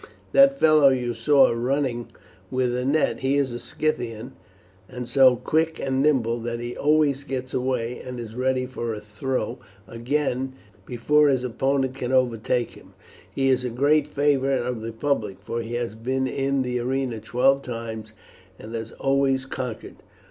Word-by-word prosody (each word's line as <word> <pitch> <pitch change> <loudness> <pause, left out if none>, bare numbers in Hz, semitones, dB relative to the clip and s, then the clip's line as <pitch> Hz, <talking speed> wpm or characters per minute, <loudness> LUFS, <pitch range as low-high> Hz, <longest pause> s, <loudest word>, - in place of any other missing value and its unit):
That 275 0 +6
fellow 155 - +6
you 125 -2 0
saw 145 +2 +4
running 120 0 -1 0.4
with 125 -1 0
a 125 - -1
net, 150 +3 +1
he 135 +2 +1
is 140 -3 +1
a 120 - -5
Scythian, 120 -6 -3 0.6
and 125 -1 -6
so 130 -2 +5
quick 160 +6 0
and 135 0 0
nimble 125 -6 +2
that 115 0 -4
he 120 +1 -5
always 145 -2 +2
gets 130 -2 -5
away, 125 -2 -1
and 125 -1 -7
is 115 -2 -7
ready 130 +1 0
for 120 -3 -4
a - - -6
throw 105 +3 -3 0.3
again 130 +3 -2 0.3
before 150 +5 +3
his 130 -3 +2
opponent 135 +2 0
can 125 -1 -4
overtake 125 -1 +1
him. - - -17 0.4
He 135 +6 +1
is 130 -1 +2
a 125 - -2
great 145 +5 +2
favourite 140 -3 +1
of 125 -3 -3
the 115 +1 -5
public, 115 -5 -2
for 115 0 -4
he 115 +1 -5
has 120 -2 -2
been 130 +4 -2
in 135 +1 0
the 125 -1 -2
arena 125 -1 -2
twelve 130 +5 +2
times 115 -3 -6 0.5
and 110 +2 -10
has 115 0 -5
always 135 -1 +1
conquered." 125 -4 -6
130 Hz, 165 wpm, -24 LUFS, 120-135 Hz, 0.6 s, That